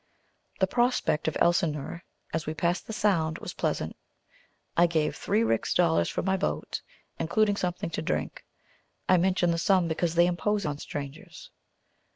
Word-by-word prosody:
The 190 Hz, -, +5 dB
prospect 240 Hz, -7 st, +1 dB
of 160 Hz, -, 0 dB
Elsineur, 170 Hz, -2 st, +1 dB, 0.3 s
as 160 Hz, -1 st, -2 dB
we 155 Hz, -, -2 dB
passed 175 Hz, +2 st, 0 dB
the -, -, -5 dB
Sound, 170 Hz, -7 st, +1 dB
was -, -, -7 dB
pleasant. -, -, -2 dB, 0.8 s
I 175 Hz, +1 st, +5 dB
gave 160 Hz, -2 st, 0 dB
three 215 Hz, +3 st, +1 dB
rix 115 Hz, -, 0 dB
dollars 85 Hz, +1 st, +3 dB
for -, -, -2 dB
my 190 Hz, +1 st, +2 dB
boat, 75 Hz, -, -2 dB, 0.4 s
including 205 Hz, +5 st, +2 dB
something 180 Hz, -3 st, -2 dB
to -, -, -2 dB
drink. 175 Hz, -, -3 dB, 0.6 s
I 185 Hz, -, +5 dB
mention 180 Hz, -1 st, +2 dB
the 170 Hz, -, 0 dB
sum, 185 Hz, -1 st, +3 dB
because 165 Hz, +1 st, -1 dB
they 170 Hz, +1 st, +6 dB
impose 200 Hz, +3 st, 0 dB
on 145 Hz, -1 st, -2 dB
strangers. 145 Hz, 0 st, -8 dB
170 Hz, 160 wpm, -28 LUFS, 155-190 Hz, 0.8 s, they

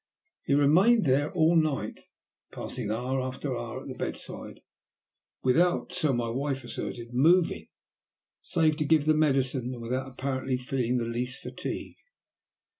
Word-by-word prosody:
He 140 Hz, -, +1 dB
remained 180 Hz, +10 st, +5 dB
there 140 Hz, +2 st, +2 dB
all 170 Hz, -2 st, +3 dB
night, 150 Hz, -10 st, 0 dB, 0.5 s
passing -, -, -4 dB
hour 125 Hz, +4 st, -1 dB
after 130 Hz, +1 st, -3 dB
hour 120 Hz, -1 st, -5 dB
at -, -, -10 dB
the -, -, -5 dB
bedside, -, -, -6 dB, 0.8 s
without, 170 Hz, +8 st, +2 dB
so 155 Hz, -, +1 dB
my 120 Hz, -2 st, 0 dB
wife 135 Hz, +2 st, -2 dB
asserted, 120 Hz, 0 st, -6 dB
moving, 155 Hz, -, +3 dB, 0.7 s
save 155 Hz, -2 st, +1 dB
to 155 Hz, -, 0 dB
give 155 Hz, -1 st, +3 dB
the 155 Hz, -, +5 dB
medicine, 135 Hz, -4 st, +1 dB
and -, -, -9 dB
without 130 Hz, +3 st, -2 dB
apparently 130 Hz, 0 st, -2 dB
feeling 125 Hz, -1 st, -1 dB
the 120 Hz, -, -1 dB
least 125 Hz, +2 st, -3 dB
fatigue. -, -, -6 dB
135 Hz, 140 wpm, -28 LUFS, 125-155 Hz, 0.8 s, remained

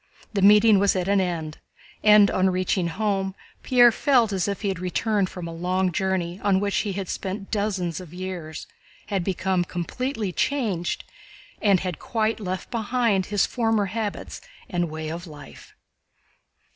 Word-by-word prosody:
The 200 Hz, -, 0 dB
meeting 210 Hz, +1 st, +7 dB
was 200 Hz, 0 st, +3 dB
at 185 Hz, -1 st, -1 dB
an 200 Hz, -1 st, +3 dB
end, 165 Hz, -4 st, -3 dB, 0.4 s
and 210 Hz, -1 st, +7 dB
on 190 Hz, 0 st, +2 dB
reaching 185 Hz, -1 st, 0 dB
home 195 Hz, +1 st, -1 dB, 0.3 s
Pierre 245 Hz, -2 st, +6 dB
felt 240 Hz, -4 st, +2 dB
as 190 Hz, 0 st, 0 dB
if 200 Hz, -1 st, -3 dB
he 200 Hz, -, +1 dB
had 190 Hz, -3 st, -3 dB
returned 195 Hz, +2 st, 0 dB
from 175 Hz, -2 st, -7 dB
a 165 Hz, -, -6 dB
long 180 Hz, +2 st, 0 dB
journey 185 Hz, 0 st, -1 dB
on 200 Hz, -2 st, +3 dB
which 200 Hz, 0 st, -1 dB
he 205 Hz, -3 st, -1 dB
had 195 Hz, -1 st, -4 dB
spent 195 Hz, +2 st, -5 dB
dozens 195 Hz, -6 st, -1 dB
of 180 Hz, -4 st, -11 dB
years, 175 Hz, -4 st, -6 dB, 0.4 s
had 195 Hz, -3 st, 0 dB
become 185 Hz, 0 st, 0 dB
completely 210 Hz, +5 st, -3 dB
changed, 210 Hz, -7 st, -1 dB, 0.6 s
and 200 Hz, -4 st, +4 dB
had 180 Hz, -4 st, -4 dB
quite 225 Hz, -1 st, -1 dB
left 185 Hz, 0 st, -5 dB
behind 230 Hz, -4 st, +1 dB
his 205 Hz, -1 st, +2 dB
former 225 Hz, -4 st, +1 dB
habits 220 Hz, -3 st, -4 dB, 0.3 s
and 175 Hz, -2 st, -1 dB
way 155 Hz, 0 st, -5 dB
of 170 Hz, +3 st, -6 dB
life. 145 Hz, -, -13 dB
190 Hz, 160 wpm, -24 LUFS, 180-210 Hz, 0.6 s, meeting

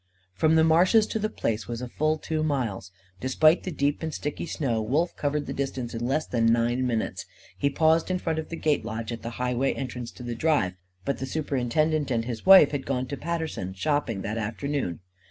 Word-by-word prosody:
From 155 Hz, -, +3 dB
the 160 Hz, -, +5 dB
marshes 180 Hz, +7 st, +5 dB
to 220 Hz, -, -3 dB
The 215 Hz, +1 st, -1 dB
Place 115 Hz, -, -2 dB
was 120 Hz, -1 st, -4 dB
a 125 Hz, -, -5 dB
full 155 Hz, +5 st, 0 dB
two 155 Hz, 0 st, -2 dB
miles. 120 Hz, -11 st, -2 dB, 0.3 s
Despite 155 Hz, +6 st, +4 dB
the 185 Hz, -, -5 dB
deep 145 Hz, -1 st, 0 dB
and 160 Hz, -1 st, -3 dB
sticky 150 Hz, +2 st, -4 dB
snow, 120 Hz, -10 st, -1 dB
Wolf 145 Hz, +11 st, 0 dB
covered 145 Hz, 0 st, -1 dB
the -, -, -4 dB
distance 130 Hz, -3 st, -3 dB
in 120 Hz, +1 st, -2 dB
less 155 Hz, +4 st, 0 dB
than 115 Hz, -2 st, +1 dB
nine 120 Hz, +2 st, +1 dB
minutes. 115 Hz, -3 st, -2 dB, 0.3 s
He 140 Hz, -, +1 dB
paused 160 Hz, +3 st, +2 dB
in 185 Hz, -, +1 dB
front 165 Hz, -3 st, -2 dB
of 160 Hz, -, -6 dB
the 165 Hz, -, -4 dB
gate 150 Hz, -6 st, +1 dB
lodge, 110 Hz, 0 st, -4 dB
at 115 Hz, -2 st, -5 dB
the 115 Hz, -, -5 dB
highway 125 Hz, +1 st, 0 dB
entrance 125 Hz, -2 st, -5 dB
to 125 Hz, -, -10 dB
the 120 Hz, -1 st, -3 dB
drive. 115 Hz, -, +1 dB, 0.3 s
But 140 Hz, -, -1 dB
the 135 Hz, -, -3 dB
superintendent 150 Hz, +1 st, 0 dB
and 115 Hz, -3 st, 0 dB
his 120 Hz, +6 st, -5 dB
wife 190 Hz, -7 st, +9 dB
had 140 Hz, -2 st, -4 dB
gone 130 Hz, -1 st, 0 dB
to 140 Hz, -, -3 dB
Paterson, 160 Hz, -, -4 dB
shopping, 115 Hz, -4 st, -1 dB
that 110 Hz, +2 st, -3 dB
afternoon. 110 Hz, -, -3 dB
140 Hz, 210 wpm, -26 LUFS, 115-155 Hz, 0.3 s, wife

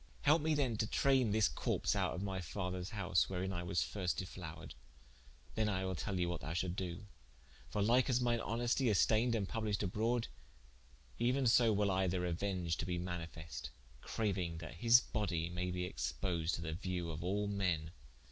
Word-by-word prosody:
Helpe 150 Hz, +3 st, +5 dB
me 155 Hz, 0 st, +2 dB
then 130 Hz, -6 st, +1 dB
to 110 Hz, -, 0 dB
traine 135 Hz, -2 st, +3 dB
this 105 Hz, 0 st, +4 dB
corps -, -, 0 dB
out -, -, 0 dB
of 95 Hz, -, -4 dB
my 95 Hz, -2 st, -2 dB
father's 90 Hz, +1 st, -4 dB
house, 90 Hz, -7 st, +1 dB
wherein 95 Hz, 0 st, -2 dB
I 85 Hz, -, -2 dB
was 85 Hz, 0 st, 0 dB
first 90 Hz, -3 st, -2 dB
defloured, 90 Hz, -4 st, -6 dB, 0.8 s
then 110 Hz, -1 st, +1 dB
will 95 Hz, -2 st, -1 dB
I -, -, -1 dB
tell 95 Hz, +2 st, -3 dB
thee 90 Hz, -1 st, +1 dB
what 85 Hz, -1 st, -3 dB
thou 75 Hz, +6 st, -4 dB
shalt 90 Hz, 0 st, -1 dB
doe: 90 Hz, 0 st, -4 dB, 0.6 s
for 105 Hz, -, 0 dB
like 120 Hz, +5 st, +4 dB
as 125 Hz, -1 st, +3 dB
mine 120 Hz, -1 st, +2 dB
honestie 120 Hz, +3 st, +1 dB
is 105 Hz, -, +3 dB
stayned 115 Hz, +2 st, +3 dB
and 100 Hz, -4 st, -1 dB
published 105 Hz, -2 st, -1 dB
abrode, 115 Hz, +5 st, 0 dB, 0.9 s
euen 125 Hz, +2 st, +2 dB
so 115 Hz, 0 st, +5 dB
will 100 Hz, -1 st, +2 dB
I 95 Hz, 0 st, +2 dB
the 90 Hz, +1 st, 0 dB
reuenge 90 Hz, -1 st, -1 dB
to -, -, -2 dB
be 90 Hz, -1 st, -1 dB
manifeste, 85 Hz, -2 st, -5 dB, 0.3 s
crauing 95 Hz, -6 st, -1 dB
that 80 Hz, +1 st, -7 dB
his 120 Hz, +5 st, +7 dB
bodie 85 Hz, -8 st, -2 dB
may 90 Hz, +1 st, -2 dB
be 90 Hz, 0 st, -2 dB
exponed 85 Hz, -2 st, -2 dB
to -, -, -2 dB
the 80 Hz, -1 st, -3 dB
viewe 90 Hz, -1 st, -3 dB
of 80 Hz, +1 st, -5 dB
all 100 Hz, +3 st, 0 dB
men." 90 Hz, -6 st, 0 dB
95 Hz, 190 wpm, -36 LUFS, 90-110 Hz, 0.9 s, his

